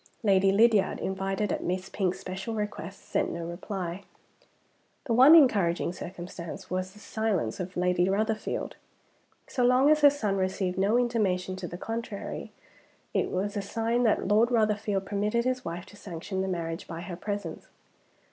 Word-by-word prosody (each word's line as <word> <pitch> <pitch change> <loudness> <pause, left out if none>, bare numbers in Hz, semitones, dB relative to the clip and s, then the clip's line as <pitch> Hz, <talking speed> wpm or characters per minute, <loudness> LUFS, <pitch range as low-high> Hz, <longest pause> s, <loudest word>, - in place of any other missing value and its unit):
Lady 195 -2 +4
Lydiard, 215 0 +4
invited 195 +1 -2
at - - -2
Miss 185 +1 -2
Pink's 190 -3 -1
special 190 +5 -5
request, 205 -3 -5
sent - - 0
no 170 0 -4
reply. 180 +1 -5 1.0
The 235 - 0
one 265 +7 +9
encouraging 200 - +4
circumstance 175 -2 -8
was 185 +1 -2
the 210 - -15
silence 210 - -1
of 180 0 -5
Lady 180 0 +2
Rotherfield. 215 +2 -1 0.7
So 250 - -1
long 255 +4 +5
as 305 0 +4
her 290 - +9
son 215 -9 -1
received 185 -1 -1
no 205 +5 +3
intimation 200 -7 0
to 185 - -5
the 175 - -7
contrary, 225 0 -5 0.6
it - - +1
was 200 +3 -2
a 205 - -1
sign 230 +4 -1
that 220 -5 +2
Lord 215 +4 +4
Rotherfield 210 -4 +1
permitted 210 +4 0
his 255 0 0
wife 170 +2 -5
to 205 - -15
sanction 190 -1 -5
the 190 - -1
marriage 165 -2 -3
by 165 -1 -6
her 180 -1 -6
presence. 200 -3 -5
195 Hz, 160 wpm, -28 LUFS, 180-220 Hz, 1.0 s, one